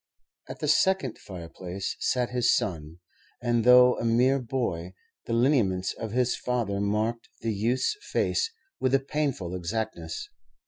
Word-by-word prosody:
At - - -8
the - - -1
second 190 - +2
fireplace 90 +1 -6
sat 125 -1 0
his 125 -2 +3
son, 80 -5 -3 0.4
and, 120 -1 +1
though 125 +1 +7
a - - -3
mere 125 +4 +3
boy, 110 -9 -3 0.3
the 115 - -2
lineaments 115 -7 +2
of 110 -2 -6
his 125 +1 +1
father 115 -6 -1
marked 110 +3 -1
the 115 -1 -1
youth's 120 - 0
face 455 - 0 0.3
with 130 +1 +2
a - - +4
painful 135 - -2
exactness. 110 - -4
115 Hz, 140 wpm, -27 LUFS, 100-125 Hz, 0.4 s, though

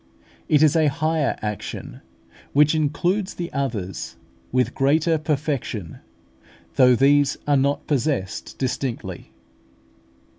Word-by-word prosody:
It 150 0 +5
is 155 0 +4
a 160 -2 +4
higher 155 +1 0
action, 105 -1 -5 0.5
which 150 +2 +5
includes 175 +6 0
the 175 -1 -5
others, 105 - -3 0.4
with 125 0 +1
greater 155 +4 +2
perfection, 140 - -3 0.7
though 125 -2 +5
these 140 +2 +3
are 145 - +3
not 140 +1 +1
possessed 135 -9 -2
distinctly. 130 -1 -4
140 Hz, 105 wpm, -23 LUFS, 130-155 Hz, 0.7 s, It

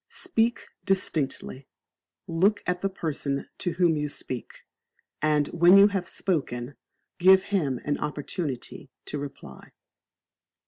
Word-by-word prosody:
Speak 235 -10 0 0.2
Distinctly, 155 -8 -1 0.6
look 190 +6 +2
at 180 0 -1
the 195 - 0
person 145 -6 -3
to 175 - -1
whom 170 -2 +3
you 150 0 -1
speak, 130 -4 -7 0.6
and 150 -1 +2
when 175 +3 +6
you 200 +1 +8
have 195 -3 -3
spoken, 135 -8 -2 0.5
give 190 +1 +7
him 150 -11 -1
an 145 - -1
opportunity 145 -2 -4 0.2
to 150 - -4
reply. 135 - -10
165 Hz, 120 wpm, -26 LUFS, 140-190 Hz, 0.6 s, you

